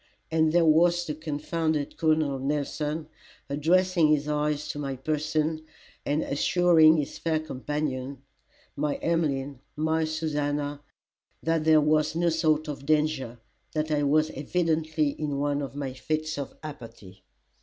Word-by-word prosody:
And 160 -1 +3
there 170 0 +4
was 170 +2 +4
the 155 - -3
confounded 155 0 -2
Col. 160 -1 +3
Nelson 150 +1 -2 0.4
addressing 170 +4 +3
his 150 -1 +2
eyes 150 0 -1
to 145 - -4
my 135 -2 -3
person, 155 +3 -1 0.4
and 145 +2 +1
assuring 160 +1 +4
his 150 - -3
fair 160 -2 0
companions, 140 -2 -4 0.6
my 145 0 -1
Emmeline, 145 -5 -1 0.2
my 160 +1 +1
Susannah, 145 -2 -2 0.6
that 165 -1 0
there 155 -1 +6
was 155 +1 +2
no 170 +1 +2
sort 155 -1 +1
of 145 -2 -6
danger, 150 -6 +1 0.4
that 155 0 -1
I 150 -1 +2
was 155 +2 +2
evidently 155 0 0
in 145 -1 -3
one 145 0 0
of 140 0 -6
my 140 -2 -4
fits 155 +3 -3
of 140 - -6
apathy. 115 -10 -10
155 Hz, 135 wpm, -27 LUFS, 145-160 Hz, 0.6 s, there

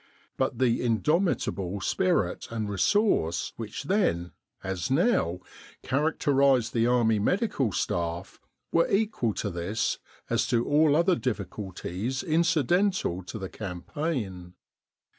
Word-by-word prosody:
But - - -1
the 125 -3 +2
in 115 -3 +1
domitable 150 - 0
spirit 175 - 0
and 110 -2 -3
resource 105 - +1
which 110 +3 -6
then, 140 - 0 0.3
as 95 +1 -3
now, 135 - +2 0.4
characterised 140 -4 +2
the 115 0 +2
Army 115 -3 +3
Medical 140 - +1
Staff, 85 +1 -3 0.3
were 170 - +3
equal 195 - 0
to 100 - -2
this 90 +6 -2 0.3
as - - +1
to 120 -1 +1
all 150 0 +4
other 170 +3 +4
difficulties 105 - -4
incidental 170 - +1
to 100 - -6
the 95 -3 -5
cam 90 -5 -6
paign. 105 - -4
120 Hz, 120 wpm, -27 LUFS, 95-160 Hz, 0.4 s, all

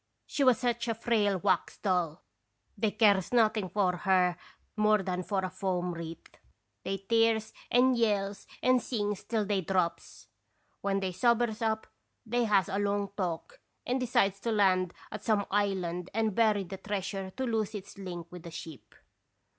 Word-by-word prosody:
She 285 - -1
was 255 -4 +6
such 240 -1 -1
a 230 - 0
frail 215 -4 +1
wax 185 -1 0
doll 180 -5 -1 0.5
they 215 0 +1
cares 200 -4 +3
noth 230 -3 +4
ing 190 -4 -2
for 185 -3 +1
her 180 -1 +3 0.4
more 215 -1 +3
than 180 -1 -2
for 190 0 -1
a - - -3
foam 180 -1 -2
wreath. 165 -1 -9 0.5
They 195 - -2
tears 225 -1 +2 0.2
and 255 +1 +4
yells 205 -4 0 0.2
and 255 -1 +4
sings 210 -5 -2
till 220 -2 -1
they 200 -1 0
drops. 180 -1 -2 0.5
When 195 0 0
they 190 -1 -1
sobers 235 +2 +1
up, 220 -1 0 0.4
they 240 +1 +1
has 200 -4 +3
a 200 0 -2
long 200 -1 0
talk 185 - -4 0.2
and 255 +2 0
decides 200 -5 +2
to 230 +3 -2
land 185 -4 +2 0.2
at - - -6
some 210 -3 +2
island 185 -4 0
and 220 -2 +1
bury 215 -2 +3
the 190 +1 -7
treasure 195 -1 -4
to 265 - -1
lose 220 -3 -1
its 200 0 -8
link 175 -3 -6
with 180 -1 -9
the 170 - -9
ship. 160 -3 -10
200 Hz, 170 wpm, -30 LUFS, 185-225 Hz, 0.5 s, was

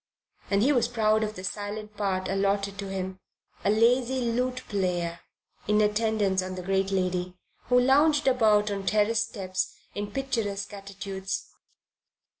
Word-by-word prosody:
And 200 +1 +3
he 275 - +4
was 245 -3 +2
proud 220 -2 +2
of 215 0 -2
the 185 - -8
silent 210 +2 -5
part 190 -2 -1
allotted 200 +1 0
to 200 - -4
him, 190 -1 -4 0.4
a - - +2
lazy 245 +4 +3
lute 250 +2 -1
player 175 -4 -1 0.5
in 210 +1 +3
attendance 210 -2 +2
on 185 0 -5
the 180 - -6
great 195 +1 +1
lady, 180 -1 -1 0.3
who 250 0 +4
lounged 290 +4 +4
about 215 -5 +4
on 195 -1 -4
terrace 215 +1 +3
steps 190 -4 -3 0.2
in 205 0 -4
picturesque 215 -5 -2
attitudes. 195 -1 -5
205 Hz, 145 wpm, -27 LUFS, 195-225 Hz, 0.5 s, he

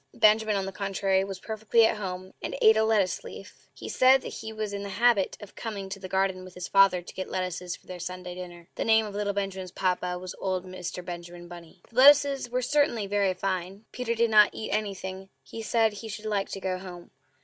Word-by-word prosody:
Benjamin, 215 -1 +4
on 195 -1 -1
the 195 - -4
contrary, 195 0 0
was 195 -1 -6
perfectly 220 +2 +2
at 220 - +1
home, 185 -2 -6
and - - -4
ate 220 0 +6
a 220 - +3
lettuce 210 -5 +1
leaf. - - -11
He - - -10
said 260 +1 +5
that - - -5
he 220 0 -7
was 215 -2 -4
in 200 - -4
the 200 - -5
habit 205 -1 +2
of 205 -2 -11
coming 200 -4 -6
to 195 - -6
the 185 -1 -8
garden 190 -1 0
with 185 -1 -12
his 180 0 -5
father 195 -2 +4
to - - -11
get 185 - -5
lettuces 180 -1 -3
for - - -21
their 180 -1 -8
Sunday 180 +1 -6
dinner. 175 -1 -9
(The - - -3
name 220 -1 +4
of 210 - -7
little 205 0 -1
Benjamin's 195 -2 -3
papa 180 0 -1
was 180 0 -7
old 185 -1 -2
Mr. 180 -1 -6
Benjamin 175 0 -8
Bunny.) 175 +1 -13
The - - -20
lettuces 280 -1 +6 0.2
certainly 285 -7 +2
were - - -9
very 200 -2 +2
fine. 190 +2 -3
Peter 240 -2 -2
did 230 0 +2
not 210 -1 +7
eat 220 - -5
anything; 195 -2 -3
he 225 - -8
said 225 0 +2
he 210 +2 -8
should 215 0 -7
like 205 -2 -1
to 195 - -5
go 185 -1 -2
home. 180 -2 -10
195 Hz, 225 wpm, -27 LUFS, 185-220 Hz, 0.2 s, not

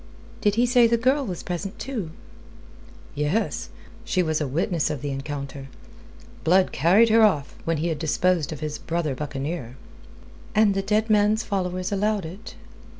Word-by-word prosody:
Did 205 -1 +2
he 240 +2 +3
say 245 -1 +5
the 235 +1 +2
girl 260 +5 +2
was 180 -3 -5
present, 185 +3 -4
too?" 235 -11 -4 1.0
"Yes. 150 +10 -1 0.3
She 195 -6 +1
was 155 -1 0
a 150 - -1
witness 165 +3 0
of 145 -3 -4
the 145 - -2
encounter. 140 0 -5 0.8
Blood 185 +3 +4
carried 190 - +4
her 225 +1 +5
off 155 -10 +3
when 165 -1 0
he 165 +3 -1
had 160 -2 -2
disposed 165 0 +1
of 155 -2 -7
his 150 -1 -4
brother 165 -4 -2
buccaneer." 140 -2 -5 0.8
"And 215 -2 +5
the 195 - 0
dead 210 +2 +1
man's 210 +1 +3
followers 185 -2 -2
allowed 205 -1 0
it?" 180 +6 -9
180 Hz, 160 wpm, -24 LUFS, 150-210 Hz, 1.0 s, say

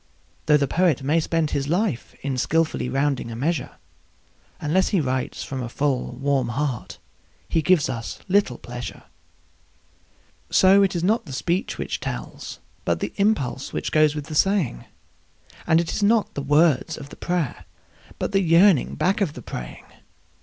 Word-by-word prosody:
Though 150 -1 +6
the 140 -1 +1
poet 165 -4 +2
may 150 +5 +2
spend 165 -1 0
his 140 -1 -1
life 175 - -1
in 135 -1 -1
skilfully 160 0 0
rounding 135 -2 0
a 115 - -6
measure, 155 +7 -2 0.8
Unless 170 +5 +1
he 200 - +2
writes 130 -3 -2
from 130 -1 -5
a 120 - -4
full, 140 0 -1
warm 135 -2 0
heart 130 0 -3 0.5
he 165 - +1
gives 155 -1 +3
us 120 -3 -5
little 190 -10 +2
pleasure. 120 0 -8 1.5
So 190 +1 +6
it 195 -2 +2
is 170 - -1
not 215 +4 +2
the 135 - -7
speech 175 +7 -1
which - - -3
tells, - - -6 0.3
but - - 0
the - - -4
impulse 195 - 0
which - - -3
goes 155 -1 +4
with 150 -2 -4
the 155 - -8
saying; 170 - +1 0.8
And 160 - +5
it 170 - -1
is - - -2
not 215 +1 +2
the 140 - -3
words 150 +1 +3
of 140 -1 -9
the - - -11
prayer, 175 -7 -2 0.5
but - - -2
the 195 - +3
yearning 170 -2 +4
back 195 +3 +1
of 170 -7 +1
the 125 - -10
praying. 60 -1 -7
150 Hz, 165 wpm, -23 LUFS, 135-180 Hz, 1.5 s, Though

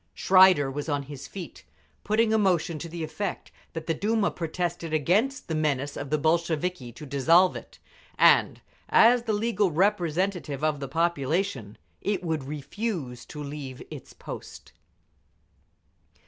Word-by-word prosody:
Schreider 185 -7 +5
was 145 +3 -5
on 145 -1 -1
his 140 -1 -9
feet, 185 -4 -9 0.4
putting 220 +1 +2
a - - +4
motion 175 -5 +1
to 170 - -6
the 165 0 -5
effect 160 +6 -5 0.2
that 165 -1 -5
the 165 - 0
Duma 210 +4 0
protested 170 -1 -3
against 210 - +1
the 160 - -3
menace 145 -3 -1
of 140 - -6
the 155 - +2
Bolsheviki 160 -3 0
to 150 - -11
dissolve 165 +7 +4
it, - - -10 0.4
and - - +4 0.3
as 240 +2 +6
the 220 - 0
legal 210 -2 +1
representative 175 -4 0
of 155 -2 +1
the 140 - -4
population, 155 - -1 0.2
it 200 -2 -1
would 160 -5 -2
refuse 150 - -5
to 150 -1 -7
leave 140 -3 -7
its - - -9
post. - - -10
165 Hz, 145 wpm, -26 LUFS, 145-190 Hz, 0.4 s, as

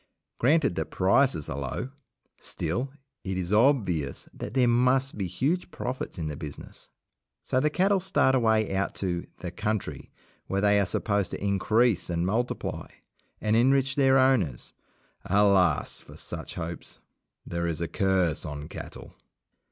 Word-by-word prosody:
Granted 140 - +3
that 80 - -2
prices 95 - +2
are 70 - -4
low, 70 - -4 0.5
still 120 +12 -3 0.3
it 95 -1 -3
is 90 +2 -2
obvious 105 - +2
that 110 - -7
there 125 -2 +4
must 125 +3 +2
be 100 -3 -2
huge 140 - -1
profits 125 - -5
in 80 - -3
the 75 - -4
business. 70 0 -9 0.5
So 130 - +1
the 150 - +2
cattle 190 +5 +2
start 175 -7 +2
away 110 -5 +2
out 100 +1 -1
to 90 -3 -3
"the 90 - -4
country", 105 +3 -3 0.4
where 95 - 0
they 100 0 +4
are 100 - +1
supposed 100 0 0
to - - -6
increase 105 +2 +2
and 85 0 0
multiply, 115 +6 -2 0.5
and 110 0 +1
enrich 135 +3 +3
their 135 -1 +4
owners. 120 - +2 0.5
Alas! 100 -6 +3
for - - -14
such - - -6
hopes. 85 -1 -6 0.5
There 85 0 -2
is 80 -2 -2
a 85 - -2
curse 95 -2 +1
on 75 0 -6
cattle. - - -9
100 Hz, 150 wpm, -27 LUFS, 85-130 Hz, 0.5 s, there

